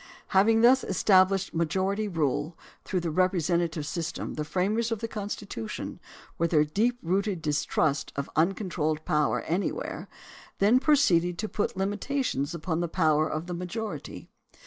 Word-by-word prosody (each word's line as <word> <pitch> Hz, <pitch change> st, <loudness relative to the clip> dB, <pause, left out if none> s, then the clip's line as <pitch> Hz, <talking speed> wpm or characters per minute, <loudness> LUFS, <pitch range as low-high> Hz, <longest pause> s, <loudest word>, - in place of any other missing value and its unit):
Having 220 Hz, +3 st, +4 dB
thus 255 Hz, +3 st, +6 dB
established 190 Hz, 0 st, +3 dB
majority 190 Hz, +6 st, 0 dB
rule 160 Hz, -2 st, -1 dB, 0.3 s
through 185 Hz, -2 st, -2 dB
the 170 Hz, -1 st, -2 dB
representative 170 Hz, -2 st, +1 dB
system, 165 Hz, +2 st, -4 dB
the 150 Hz, -, -3 dB
framers 205 Hz, +8 st, 0 dB
of 225 Hz, -, 0 dB
the 230 Hz, -, -4 dB
Constitu 205 Hz, -, -5 dB
tion -, -, -6 dB, 0.4 s
with 170 Hz, 0 st, +2 dB
their 155 Hz, -2 st, +4 dB
deep 225 Hz, +11 st, 0 dB
rooted 190 Hz, +2 st, 0 dB
distrust 150 Hz, -1 st, 0 dB
of 140 Hz, 0 st, -3 dB
uncontrolled 160 Hz, -3 st, 0 dB
power 150 Hz, -1 st, +1 dB
anywhere, 180 Hz, +5 st, -3 dB, 0.5 s
then 215 Hz, +6 st, +4 dB
proceeded 180 Hz, -, +3 dB
to 215 Hz, -, -2 dB
put 205 Hz, -2 st, -2 dB
limitations 200 Hz, -, -1 dB
upon 165 Hz, 0 st, -2 dB
the 175 Hz, -, 0 dB
power 155 Hz, -3 st, +2 dB
of 155 Hz, +2 st, -3 dB
the 180 Hz, -, -5 dB
majority. 180 Hz, +6 st, -5 dB
180 Hz, 145 wpm, -27 LUFS, 160-205 Hz, 0.5 s, thus